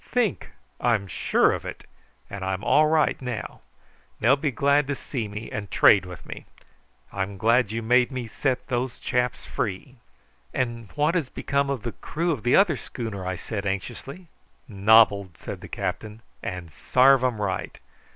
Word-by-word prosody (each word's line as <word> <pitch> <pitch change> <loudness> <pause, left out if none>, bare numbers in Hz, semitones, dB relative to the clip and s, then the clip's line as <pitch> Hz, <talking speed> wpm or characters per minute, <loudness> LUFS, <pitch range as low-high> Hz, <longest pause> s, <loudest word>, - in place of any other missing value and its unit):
"Think! 240 -6 0 0.3
I'm 115 -5 +1
sure 95 - +2
of - - -3
it; - - -8 0.4
and 100 +3 -7
I'm 95 +1 -2
all 155 +1 +4
right 155 -2 +2
now. 125 -4 -5 0.6
They'll 120 +5 +5
be 145 +1 -1
glad 140 +3 +2
to 145 - -1
see 125 -5 -4
me 105 +2 -7
and 105 -2 -5
trade 95 -3 +5
with 90 -2 -10
me. - - -9 0.7
I'm 100 0 -3
glad 115 +1 +3
you 115 +1 -3
made 125 +3 +3
me 130 -2 -4
set 130 +3 -2
those 125 -1 -2
chaps 125 0 -1
free." 115 +6 -4 0.6
"And 120 -3 -2
what 150 +2 +2
has 165 -8 -1
become 140 0 -1
of 135 -5 -2
the 120 - -3
crew 170 +8 -2
of 140 -8 -2
the 120 +2 +3
other 180 -8 +4
schooner?" 105 -8 -6
I 95 - -2
said 100 +2 -5
anxiously. 135 - -5 0.4
"Nobbled," 100 -3 +4
said - - -7
the - - -9
captain; 105 +4 -5 0.2
"and 90 -4 -6
sarve 130 - +4
'em 125 -4 0
right. 95 -3 -3
115 Hz, 170 wpm, -25 LUFS, 100-135 Hz, 0.7 s, They'll